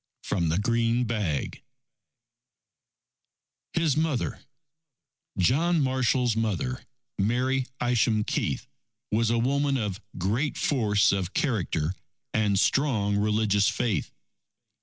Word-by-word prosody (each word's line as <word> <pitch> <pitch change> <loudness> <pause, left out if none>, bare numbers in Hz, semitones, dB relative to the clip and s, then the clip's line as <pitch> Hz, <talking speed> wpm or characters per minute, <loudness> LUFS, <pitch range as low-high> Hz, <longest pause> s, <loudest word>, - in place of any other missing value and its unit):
From 85 -5 0
the 80 - +1
Green 115 +3 +1
Bag 105 - -2 2.1
HIS 165 -5 +2
MOTHER 155 -4 -1 1.0
John 160 - +3
Marshall's 130 -3 +1
mother, 115 +4 -2 0.4
Mary 125 +5 +1
Isham 115 -3 +2
Keith, - - -2 0.5
was 110 +1 +2
a 115 - +2
woman 140 +3 +1
of 105 -3 -3 0.2
great 110 - -1
force 105 -7 +2
of 95 -2 -2
character 90 - 0 0.4
and 105 -3 +2
strong 110 -7 +2
religious 105 -1 +2
faith. 110 -10 -1
115 Hz, 95 wpm, -27 LUFS, 100-130 Hz, 2.1 s, John